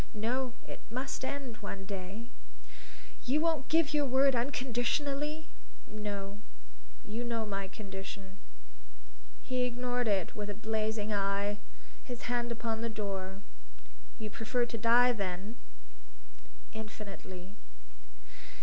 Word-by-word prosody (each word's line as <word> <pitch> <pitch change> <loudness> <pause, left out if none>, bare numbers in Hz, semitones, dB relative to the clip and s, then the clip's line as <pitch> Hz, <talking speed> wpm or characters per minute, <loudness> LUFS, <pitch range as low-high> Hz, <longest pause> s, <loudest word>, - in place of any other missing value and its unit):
"No; 245 +4 +1
it - - -5
must 255 +3 -2
end 260 -4 -2
one 195 -1 -4
day." 195 +3 -4 1.0
"You 275 +5 +5
won't 315 -4 +2
give 320 -2 +5
your 295 -1 +4
word 265 +1 +6
unconditionally?" 275 +5 +1 0.4
"No; 205 -1 -3 0.7
you 225 +3 -2
know 230 -2 0
my 195 -2 -1
condition." 195 -1 -6 1.1
He 255 -1 +1
ignored 245 0 +1
it 195 -4 +2
with 210 -1 -2
a 205 - -2
blazing 220 0 +1
eye, 200 +1 +2 0.4
his 245 -2 -5
hand 240 -1 +1
upon 225 -1 0
the 230 - +1
door. 195 -2 -2 0.7
"You 215 -2 -4
prefer 240 +2 +2
to 235 - -4
die, 240 +3 +7
then?" 200 0 -2 1.2
"Infinitely." 200 -3 -6
220 Hz, 115 wpm, -34 LUFS, 200-250 Hz, 1.2 s, die